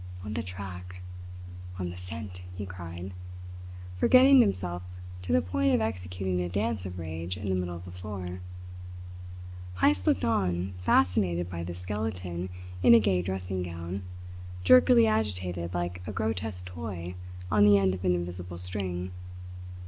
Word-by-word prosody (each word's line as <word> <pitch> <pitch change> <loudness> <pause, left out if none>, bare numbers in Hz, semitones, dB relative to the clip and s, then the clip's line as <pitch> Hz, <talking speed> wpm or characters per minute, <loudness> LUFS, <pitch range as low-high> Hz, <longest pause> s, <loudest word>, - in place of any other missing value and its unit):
"On 105 - -4
the - - -1
track! 90 -1 -7 0.7
On 90 -2 -3
the - - -8
scent!" 90 +1 -7
he 100 +2 -4
cried, 90 0 -7 0.8
forgetting 260 - +7
himself 90 - 0 0.4
to 90 -2 -4
the 85 0 +4
point 90 +1 +2
of - - +3
executing 90 -3 -2
a 90 - -2
dance 100 +1 -1
of 90 0 -7
rage 85 +2 -4
in 100 +2 -4
the - - +2
middle 90 -1 -1
of 85 +1 -9
the 90 - -8
floor. 90 -1 -6 1.3
Heyst 95 0 +3
looked 95 - +3
on, 95 -4 0
fascinated 90 -1 +2
by 85 -1 -4
this 85 0 -5
skeleton 90 -3 -3 0.3
in 115 - +8
a - - +8
gay 95 -4 +2
dressing 95 0 -3
gown, 85 +2 -4 0.6
jerkily 120 +2 +7
agitated 90 -5 -1
like 90 +1 -2
a - - -2
grotesque 105 -3 -2
toy 90 0 -5 0.4
on 105 -2 +5
the 105 -1 +8
end 95 -1 +3
of 90 0 -5
an 90 -1 +3
invisible 90 0 -5
string. 90 0 -3
90 Hz, 150 wpm, -29 LUFS, 90-100 Hz, 1.3 s, in